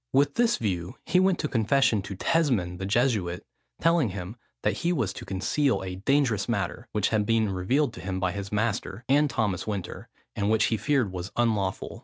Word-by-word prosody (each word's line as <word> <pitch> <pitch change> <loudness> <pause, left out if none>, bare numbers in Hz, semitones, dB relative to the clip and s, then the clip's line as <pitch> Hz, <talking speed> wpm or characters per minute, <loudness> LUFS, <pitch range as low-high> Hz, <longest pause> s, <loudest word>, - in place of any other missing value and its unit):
With 140 +1 +3
this 235 -1 +2
view, 90 -5 -3
he 180 - +3
went 185 -1 +3
to 150 - -1
confession 115 -2 +2
to 100 +1 -7
Tesmond 100 - +1
the 95 - -3
Jesuit, 105 -6 0 0.3
telling 165 -7 +3
him 95 +2 -6 0.3
that - - +1
he 170 - 0
was 115 - 0
to - - -8
conceal 115 +6 0
a 90 -1 -5
dangerous 120 -1 +1
matter, 110 +2 -2
which 105 -2 +1
had 110 -2 +2
been 110 -1 +1
revealed 115 +9 +1
to - - -9
him 95 0 -3
by 95 -1 0
his 100 +1 -6
master, 110 0 -2
and 145 +2 +4
Thomas 110 -7 -1
Winter, 100 -4 -5 0.3
and 100 0 0
which 110 0 +3
he - - +1
feared 130 -6 +1
was 90 +1 -6
unlawful. 105 -5 -1
110 Hz, 195 wpm, -27 LUFS, 95-135 Hz, 0.3 s, and